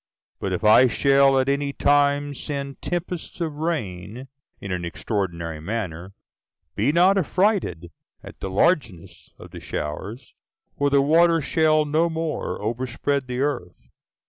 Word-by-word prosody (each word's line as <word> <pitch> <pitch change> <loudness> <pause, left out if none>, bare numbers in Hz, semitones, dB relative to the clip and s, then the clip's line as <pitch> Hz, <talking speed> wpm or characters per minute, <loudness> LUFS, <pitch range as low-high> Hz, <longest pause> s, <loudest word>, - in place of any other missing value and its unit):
But 95 - -3
if 90 - -3
I 110 +4 +7
shall 135 +1 +4
at 130 - 0
any 140 0 0
time 145 0 +2
send 140 0 -6
tempests 175 0 -4
of 160 -4 -3
rain, 125 - -4 0.3
in 100 - -7
an 90 -1 -2
extraordinary 85 -3 -3
manner, 95 -1 -5 0.6
be 115 +8 +2
not 185 +4 +4
affrighted 180 - 0 0.3
at - - -12
the 95 - -4
largeness 95 - -1
of - - -13
the - - -9
showers; 100 - -6 0.4
for 145 0 +1
the 140 0 +3
water 165 +3 +4
shall 155 +1 +2
no 160 +3 +1
more 160 -1 -3
overspread 125 +5 -2
the 125 +1 -3
earth. 125 -12 -4
135 Hz, 140 wpm, -23 LUFS, 100-155 Hz, 0.6 s, I